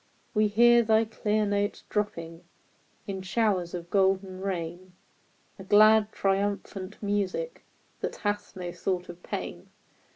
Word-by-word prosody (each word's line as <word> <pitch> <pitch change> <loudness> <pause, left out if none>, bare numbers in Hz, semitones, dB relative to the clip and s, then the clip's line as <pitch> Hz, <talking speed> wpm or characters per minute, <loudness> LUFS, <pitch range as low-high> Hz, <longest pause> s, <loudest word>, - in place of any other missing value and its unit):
We 215 -1 +3
hear 235 +3 +6
thy 220 0 +3
clear 215 -1 0
notes 205 0 -1
dropping 170 -6 -3 0.6
In 195 -1 -4
showers 190 -3 0
of 170 -1 -7
golden 190 -1 +1
rain, 180 -1 -4 0.7
A - - -7
glad, 215 +2 +6
triumphant 195 0 -1
music 205 - -2 0.4
That - - -3
hath 205 -1 -3
no 180 -2 -5
thought 180 0 -3
of 175 0 -10
pain - - -6
200 Hz, 125 wpm, -28 LUFS, 185-210 Hz, 0.7 s, hear